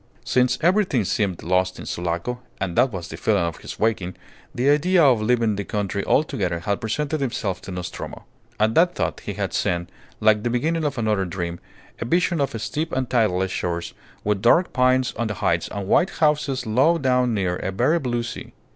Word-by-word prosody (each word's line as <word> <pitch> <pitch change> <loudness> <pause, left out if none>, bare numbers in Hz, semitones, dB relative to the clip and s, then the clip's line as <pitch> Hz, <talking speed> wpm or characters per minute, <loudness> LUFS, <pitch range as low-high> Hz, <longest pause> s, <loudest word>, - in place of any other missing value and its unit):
Since 125 0 +2
everything 175 - +2
seemed 95 -3 -1
lost 90 +2 +1
in - - -8
Sulaco 85 +8 -3 0.2
(and 90 -3 -2
that 130 - +4
was 90 -5 -5
the - - -7
feeling 105 -5 +1
of 85 -2 -3
his - - -8
waking), 105 -5 0 0.4
the 125 +3 0
idea 170 +4 +4
of 125 -6 +5
leaving 115 -2 +2
the 100 - -2
country 100 -1 -2
altogether 95 - +1
had 100 +4 -1
presented 145 +7 -2
itself 105 -8 -2
to 95 - -8
Nostromo. 90 -1 -6 0.3
At 110 +1 +3
that 175 +4 +4
thought - - -2
he 105 - -5
had 100 -1 -3
seen, 85 -3 0 0.3
like 105 -1 +4
the 120 - -1
beginning 155 +7 0
of 145 -2 -2
another 105 -4 +1
dream, 85 -1 -4 0.4
a - - -3
vision 170 +3 +1
of 125 -5 -1
steep 160 +9 -3
and 130 -2 -1
tideless 95 -6 +2
shores, 85 -2 -3 0.3
with 105 -2 0
dark 165 - +4
pines 130 0 +2
on 120 - 0
the 105 - -3
heights - - 0
and 100 -2 -4
white 180 - +4
houses 150 -5 +1
low 130 +10 +3
down 125 -4 +2
near 90 -3 0
a - - -3
very 130 - +2
blue 120 -4 -1
sea. 120 0 -7
115 Hz, 195 wpm, -23 LUFS, 95-135 Hz, 0.4 s, of